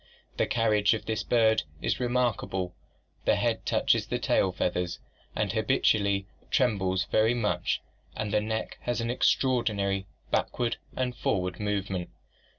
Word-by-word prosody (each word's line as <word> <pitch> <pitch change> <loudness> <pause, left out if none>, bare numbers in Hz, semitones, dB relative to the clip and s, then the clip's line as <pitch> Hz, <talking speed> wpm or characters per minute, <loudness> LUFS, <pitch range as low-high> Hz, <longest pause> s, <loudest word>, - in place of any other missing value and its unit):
The - - +2
carriage 110 -2 +3
of 110 - -6
this 110 -1 -1
bird 110 -1 +3 0.2
is - - -1
remark 125 -2 +1
able, 90 -2 -3 0.5
the - - +4
head - - -1
touches - - +2
the - - -1
tail 95 - +2
feathers, 90 -1 -1 0.4
and - - 0
habitually 100 -2 +2 0.2
trembles 100 -6 +1
very 110 +2 +4
much, 110 -3 0 0.3
and 105 -1 -3
the 105 - +3
neck 110 +1 -3
has 120 0 -1
an 115 0 -1
extraordinary 105 -7 +1 0.2
backward 120 -1 0 0.2
and 125 -1 -1
for 100 - +1
ward 90 0 -4
movement. 100 -3 -2
105 Hz, 145 wpm, -28 LUFS, 95-115 Hz, 0.5 s, the